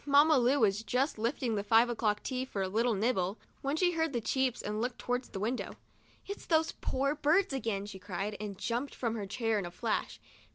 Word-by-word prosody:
Mamma 290 +1 +6
Lu 255 +4 +3
was 210 -1 +3
just 250 +2 0
lifting 235 +1 0
the 205 -2 -1
five 225 +3 +5
o'clock 215 -3 0
tea 255 -1 -2
for 205 -7 -3
a - - -1
little 225 +4 +1
nibble, 200 -2 0 0.2
when 275 +2 0
she 355 +1 +3
heard 320 -3 0
the 240 - +1
cheeps 260 +2 0
and 210 +1 -2
looked 245 +1 -2
towards 245 +1 -2
the 195 - -6
window. 230 +5 -2 0.3
" - - -32
It's 400 +1 -7
those 320 -1 +3
poor 275 +2 -1
birds 305 +3 +2
again," 225 -7 -2
she 200 -2 -8
cried, 200 +2 -4
and 205 -2 -5
jumped 240 +7 -2
from 230 -3 -1
her 210 -3 -4
chair 225 +1 0
in 195 - -3
a - - -6
flash. 220 +5 -2
235 Hz, 220 wpm, -32 LUFS, 210-270 Hz, 0.3 s, Mamma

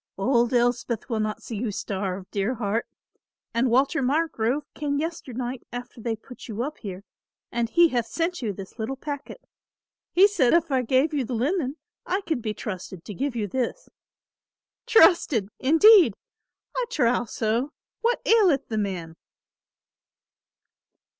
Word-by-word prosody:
Old 235 +3 +2
Elspeth 245 -1 0
will 225 - 0
not 215 0 -2
see 225 - -5
you 230 +2 -2
starve, 195 -2 -3
dear 205 +5 -1
heart; 225 0 -1 0.7
and 240 +2 +2
Walter 270 +4 +2
Margrove 275 -2 0
came 285 -1 -2
yesternight 260 -6 -4
after 245 -1 -7
they 230 0 -1
put 250 +3 -13
you 225 +1 -3
up 300 +3 -5
here 195 -3 -7 0.5
and 235 -1 -1
he 340 +5 +5
hath 240 -4 -1
sent 340 +5 -2
you 220 -4 -1
this 195 +3 -10
little 225 +5 -2
packet. 285 - -7 0.7
He 380 +3 +7
said 320 -12 +2
if 335 -2 +1
I 260 -1 +3
gave 260 +6 +2
you 285 -3 +1
the 245 +1 -4
linen 280 +3 0 0.3
I 380 +3 -1
could 320 -9 -2
be 215 -2 -3
trusted 185 -4 -7
to 210 - -6
give 270 +4 -2
you 220 -3 -1
this. 260 - -3 1.0
'Trusted,' 300 - +5
indeed! 345 +8 +7 0.6
I - - 0
trow 245 - +2
so; 230 +5 -1 0.3
what 475 +1 +1
aileth 375 - +4
the 220 -2 -1
man?" 180 -5 -3
245 Hz, 150 wpm, -25 LUFS, 220-300 Hz, 1.0 s, He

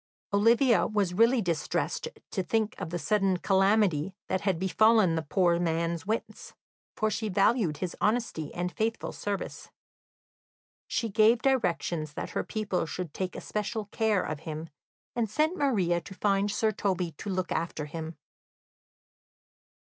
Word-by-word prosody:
Olivia 230 +4 +4
was 205 -4 0
really 230 +4 +4
distressed 170 - -1 0.2
to 190 - -1
think 220 +3 0
of 185 - -3
the 175 - -2
sudden 195 0 +1
calamity 195 -3 +2
that 190 - 0
had 195 -4 +1
befallen 200 +1 +4
the 165 - 0
poor 170 +2 +2
man's 170 +1 -1
wits, 220 +2 -4 0.4
for 215 0 0
she 220 0 -2
valued 195 - +2
his 180 +2 -4
honesty 210 -8 0
and 180 +1 -2
faithful 225 +3 -2
service. 205 -1 -5 1.2
She 230 - -1
gave 220 +3 +4
directions 170 - 0
that - - -5
her - - -1
people 205 -6 -2
should 175 -2 -5
take 185 -1 -3
especial 210 +1 -3
care 220 -4 +1
of 155 -2 -4
him, 155 +1 -6 0.4
and 235 -3 0
sent 310 - +1
Maria 195 - +1
to 190 +4 -11
find 200 +1 +1
Sir 215 +1 +1
Toby 185 -4 -1
to 205 - -5
look 185 -2 -2
after 160 -3 -2
him. 160 +1 -6
195 Hz, 145 wpm, -28 LUFS, 170-220 Hz, 1.2 s, Olivia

